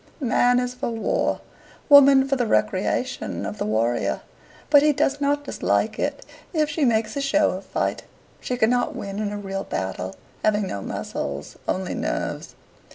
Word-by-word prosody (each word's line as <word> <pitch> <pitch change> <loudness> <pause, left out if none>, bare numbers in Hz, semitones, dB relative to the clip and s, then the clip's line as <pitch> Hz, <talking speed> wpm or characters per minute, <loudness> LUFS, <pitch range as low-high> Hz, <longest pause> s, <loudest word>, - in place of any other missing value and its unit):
Man 245 -2 +3
is 250 0 -2
for 250 - -3
war, 225 -1 -1 0.5
woman 275 -2 +8
for 275 - +1
the 245 -3 0
recreation 110 - 0
of - - -5
the - - -1
warrior, 115 +3 0 0.5
but 290 -2 +8
he 300 0 +4
does 280 +1 0
not 285 +1 +1
dislike - - 0
it - - -2 0.3
if 310 -2 +1
she 295 -1 +1
makes 225 0 +1
a 280 - -1
show 295 +2 +3
of 190 +2 -6
fight. - - -1 0.4
She 250 - -3
cannot 245 +1 +2
win 200 0 -5
in 210 -1 -2
a 205 - -4
real 195 -1 -4
battle, 95 0 -4 0.3
having 210 -1 +2
no 100 - -4
muscles, 70 -6 -5
only 185 -1 -1
nerves. - - -3
235 Hz, 165 wpm, -23 LUFS, 195-280 Hz, 0.5 s, woman